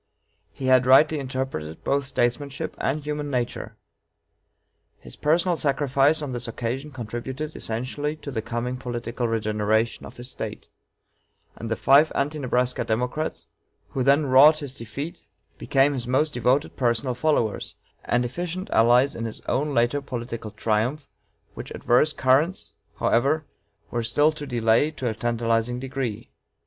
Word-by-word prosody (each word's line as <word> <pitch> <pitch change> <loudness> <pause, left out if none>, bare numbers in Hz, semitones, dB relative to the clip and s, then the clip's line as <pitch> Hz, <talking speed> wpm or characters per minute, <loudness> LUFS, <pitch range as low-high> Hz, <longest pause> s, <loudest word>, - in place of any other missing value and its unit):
He 130 - -7
had 130 -1 +4
rightly 150 +4 +6
interpreted 130 - -4
both 140 0 +1
statesmanship 130 +2 -1
and 145 +3 -1
human 150 -1 -3
nature. 125 -3 -3 1.2
His - - -12
personal 170 +3 +2
sacrifice 140 +1 +2
on 140 - -4
this 125 -1 -3
occasion 120 +5 -4
contributed 130 +4 -5
essentially 130 +6 -3
to 150 -2 -8
the 115 -4 -2
coming 120 +3 -3
political 120 -1 -3
regeneration 110 0 0
of - - -13
his 120 0 -7
State; - - -6 0.9
and 115 - -6
the 115 - 0
five 145 +6 +5
Anti 150 +2 -1
Nebraska 125 -1 0
Democrats, 125 +8 -2 0.4
who 135 - -3
then 140 +3 +4
wrought 140 +4 +7
his 145 -4 -6
defeat, 140 - -7 0.4
became 140 +1 +3
his 125 -3 -4
most 145 +4 +1
devoted 125 +5 +1
personal 125 +1 0
followers 125 -4 0 0.3
and 120 +1 +1
efficient 175 +8 -4
allies 120 +4 +4
in 115 - -4
his 110 - -4
own 145 +3 -1
later 120 +2 +2
political 120 -4 -5
triumph, 110 +7 -1 0.5
which - - -8
adverse 125 +6 +2
currents, 135 - +1 0.2
however, 145 +6 +1 0.5
were 120 - -1
still 145 +7 +3
to 150 -2 -7
delay 115 +3 +2
to 145 -5 -5
a 110 - 0
tantalizing 115 +1 0
degree. 130 -4 -4
130 Hz, 140 wpm, -24 LUFS, 120-145 Hz, 1.2 s, wrought